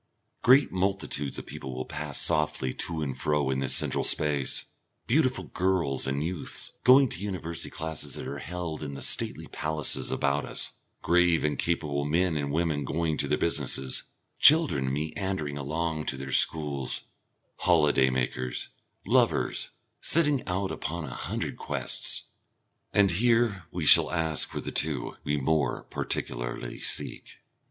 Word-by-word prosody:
Great 130 +4 +5
multitudes 95 -7 -1
of - - -6
people 65 -1 -7
will 65 - -4
pass 75 -2 -2
softly 75 -4 +1
to 80 -2 -3
and 65 -3 -4
fro 75 -2 +1
in 65 - -1
this 65 -1 +3
central - - +2
space, 75 -4 +1 0.4
beautiful 130 0 +2
girls 90 -9 0
and 70 +2 -1
youths 85 +1 -2
going 130 +2 +7
to 110 - -5
the - - -7
University 85 -4 -4
classes 80 -3 -4
that - - -6
are 70 +1 -5
held 85 -2 -5
in 70 -2 -5
the - - -7
stately - - +1
palaces 80 -2 0
about 70 0 0
us, - - -4 0.3
grave 85 -1 +3
and 75 -1 -1
capable 75 -4 0
men 80 +3 +1
and 70 -2 -2
women 80 -2 0
going 80 +2 -1
to 70 - -1
their 75 +1 +1
businesses, 65 -5 +1 0.3
children 140 - +5
meandering 75 +1 -3
along 80 +2 -2
to 65 - -2
their 65 0 -6
schools, 70 -3 +1 0.6
holiday 75 -6 +3
makers, 65 -1 -2 0.4
lovers, - - +1 0.3
setting 150 -5 +3
out 95 +1 -1
upon 85 +1 -4
a - - -7
hundred - - -4
quests; - - -1 0.7
and 100 -2 +4
here 115 -1 +2
we 85 -3 -4
shall - - +7
ask 80 -3 -1
for - - -5
the - - -5
two 75 -5 -1
we 75 - 0
more 75 0 0
particularly - - -4
seek. - - -2
75 Hz, 150 wpm, -28 LUFS, 70-90 Hz, 0.7 s, going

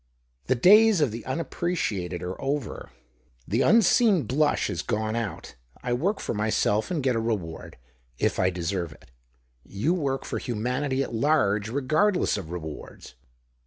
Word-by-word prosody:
The 130 - +3
days 210 - +6
of 145 -7 +2
the 115 +2 -6
unappre 170 +5 -2
ciated 90 - -2
are 90 +1 -5
over. 135 -4 -3 0.6
The 115 +6 +1
unseen 215 - +4
blush 145 +3 +1
is - - -3
gone 110 +1 -2
out. 115 -4 -4 0.3
I 125 - -1
work 185 - 0
for - - -3
myself 105 0 0
and 165 -6 -2
get 130 -2 +2
a - - +1
reward, 105 -8 -4 0.4
if - - 0
I 90 -1 +3
deserve 85 -2 -3
it. - - -21 0.5
You 110 - -1
work 140 -6 -2
for - - -3
humanity 130 +4 -1
at - - -7
large, 110 -6 +1
regardless 155 - +1
of 95 -6 -6
rewards." 80 -6 -8
125 Hz, 155 wpm, -26 LUFS, 100-155 Hz, 0.6 s, days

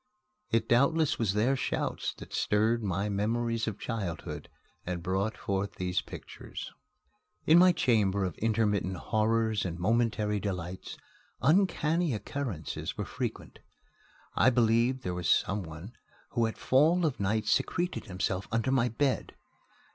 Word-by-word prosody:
It 115 - +1
doubtless 150 +6 +3
was 105 -4 +1
their 120 +6 +3
shouts 130 - -2
that - - -11
stirred 110 +3 +2
my 100 0 -1
memories 115 +3 -1
of 105 -2 -3
childhood 100 -8 -5 0.3
and 85 -1 -4
brought 95 +4 -1
forth 100 0 -2
these 90 -2 -1
pictures. - - -9 0.7
In 160 +2 +7
my 180 +1 +7
chamber 105 - +2
of 90 - -4
intermittent 105 -4 +1
horrors 110 - +1
and 85 -2 -3
momentary 105 +1 +1
delights, 90 -2 -5 0.4
uncanny 165 - +2
occurrences 105 - -4
were - - -2
frequent. - - -5 0.8
I 130 - +5
believed 120 +1 +2
there 90 - -2
was 90 -4 -2
some 100 +2 +2
one 85 +6 -9 0.4
who 115 -2 +2
at 110 - -6
fall 160 +7 +3
of 145 -5 -1
night 105 +2 0
secreted 175 +1 0
himself 95 +1 -2
under 115 +3 +1
my 125 -2 +3
bed. 130 +4 -1
110 Hz, 135 wpm, -30 LUFS, 95-125 Hz, 0.8 s, In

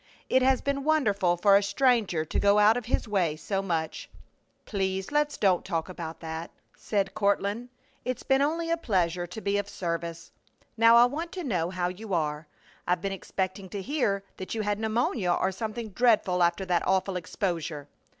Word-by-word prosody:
"It 260 - +4
has 260 0 +3
been 280 0 -1
wonderful 205 - +2
for 195 +3 +5
a 200 - +6
stranger 205 -5 +2
to - - -2
go 200 0 +4
out 210 +2 +6
of 245 -2 -3
his 235 - -1
way 180 -7 +1
so 195 +5 -2
much." 165 -5 -3 0.6
"Please 190 -2 -1
don't - - -11
let's 295 0 +1
talk 175 -4 +1
about 165 -3 -7
that!" 160 0 -5 0.3
said 200 -2 -1
Courtland. 205 +3 0 0.3
"It's 255 -1 -3
been 270 0 +3
only 330 +3 0
a 335 - +2
pleasure 180 - 0
to 180 +5 -8
be 200 0 +1
of 205 0 -4
service. 170 -2 -4 0.4
Now 230 0 +6
I 235 +1 +8
want 315 +7 -3
to 365 - -4
know 180 - -1
how 180 -1 -1
you 190 +2 -4
are. 150 -1 -2 0.4
I've 180 0 +1
been 195 - -1
expecting 190 0 -4
to 200 0 -5
hear 225 -8 0
that 185 +4 -5
you 220 - -1
had 205 0 -1
pneumonia 220 -4 0
or 190 +2 +1
something 220 +3 -5
dreadful 210 -5 +2
after 170 +2 +2
that 175 -2 0
awful 190 0 +1
exposure." 165 -4 -3
195 Hz, 185 wpm, -27 LUFS, 175-230 Hz, 0.6 s, I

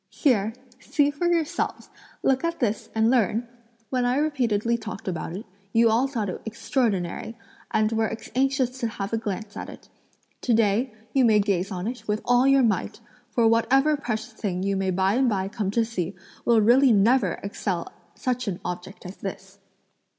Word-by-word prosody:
"Here! 225 -7 +1 0.3
see 290 +1 +1
for 290 +5 -1
yourselves; 330 -3 -1 0.3
look 265 +2 +2
at 335 0 -1
this 220 -4 -1
and 220 +1 +3
learn! 235 -1 +1 0.4
When 255 -1 +1
I 245 +1 +2
repeatedly 235 -7 +1
talked 220 -4 -7
about 170 -1 -3
it, 215 - -8 0.3
you 230 0 +5
all 240 +5 +3
thought 230 -7 -2
it 185 - -5
extraordinary, 225 -2 -2 0.3
and 215 0 +1
were 225 0 0 0.2
anxious 260 -1 +1
to 235 - 0
have 200 -1 -5
a 225 - +1
glance 210 -1 -5
at - - -6
it; - - -13 0.5
to 240 - +2
day, 225 +3 +2 0.2
you 270 - +4
may 220 -3 +5
gaze 195 -2 0
on 180 -1 -4
it 245 +3 -5
with 210 0 0
all 245 +2 +4
your 275 -1 +5
might, 210 -7 0 0.3
for 235 -2 +3
whatever 270 +6 +3
precious 240 -4 -4
thing 190 -4 -3
you 200 0 0
may 195 0 0
by 190 +2 +2
and 255 +1 +3
by 190 -3 0
come 205 -1 -3
to 225 +3 +1
see 195 -5 -3 0.3
will 230 -2 +5
really 250 +4 +5
never 210 -1 +4
excel 195 -3 -3 0.2
such 250 -2 -2
an 180 -3 -2
object 180 +3 -6
as 180 +2 -8
this!" - - -8
225 Hz, 180 wpm, -25 LUFS, 200-255 Hz, 0.5 s, you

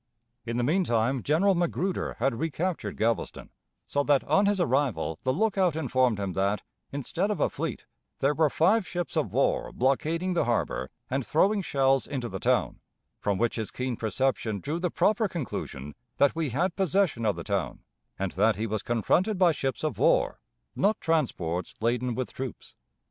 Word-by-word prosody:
In 115 +1 -2
the 120 - +1
mean 170 +9 +2
time 120 -1 +1
General 170 - +3
Magruder 175 +1 -1
had 135 +3 +1
recaptured 165 +3 -2
Galveston, 115 +1 -1 0.3
so 145 - 0
that 145 -2 +3
on 200 +1 +3
his 205 -1 +2
arrival 135 - 0
the 130 - +1
lookout 190 -1 +1
informed 130 -7 +1
him 100 -2 -2
that, 100 +2 0 0.3
instead 155 - -2
of 210 - -1
a - - +2
fleet, - - -4 0.3
there 140 +2 +2
were 155 0 +3
five 190 +7 +3
ships 175 0 -4
of - - 0
war - - +1
blockading 160 +8 0
the 175 - +1
harbor 115 - -1 0.2
and 135 +1 -1
throwing 195 - +2
shells 135 -5 +2
into 125 -4 -3
the - - -5
town, - - +1 0.4
from 100 -2 0
which 120 +3 0
his 110 -2 -3
keen 125 -1 -3
perception 110 -2 -1
drew 150 - -3
the 180 0 0
proper 215 +5 +2
conclusion 75 - -5 0.2
that 140 +2 +4
we 160 -3 -1
had 175 +8 0
possession 190 -9 +1
of 105 -2 +2
the - - -6
town, - - -2 0.3
and 95 -2 -2
that 105 +3 +3
he 110 +4 -2
was 110 -2 -2
confronted 180 - +1
by 180 -2 +5
ships 135 -3 -3
of 155 - -2
war, - - +3 0.4
not 210 +3 +2
transports 95 - -1
laden 120 +1 0
with 130 +1 -3
troops. 130 -4 -7
135 Hz, 175 wpm, -27 LUFS, 115-175 Hz, 0.4 s, by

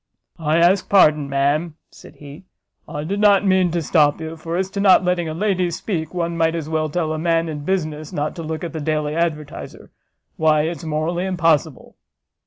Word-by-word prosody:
"I 155 0 +1
ask 180 +3 +3
pardon, 155 -7 +4
ma'am," 145 +4 0 0.2
said - - -15
he, 145 +5 -12 0.4
"I 150 - -5
did 195 +6 -3
not 205 -1 +4
mean 185 -2 +3
to 170 0 -2
stop 150 -1 +2
you; 160 0 -6
for 165 +1 -5
as 190 +1 -2
to 200 - -4
not 195 -2 +5
letting 175 -2 0
a 155 - -5
lady 185 -1 0
speak, 165 -2 -4
one 170 -1 -2
might 165 0 +1
as 160 -3 -4
well 155 -1 -1
tell 155 0 -1
a 155 - -4
man 165 0 +1
in 155 -2 -5
business 155 -5 -2
not 150 +1 -3
to - - -5
look 160 0 -5
at 170 - -5
the 160 - -4
Daily 150 0 -1
Advertiser; 155 -3 -4 0.5
why, 155 -1 +3
it's 165 +2 -4
morally 160 +3 -2
impossible!" 165 -5 0
165 Hz, 195 wpm, -20 LUFS, 155-175 Hz, 0.5 s, not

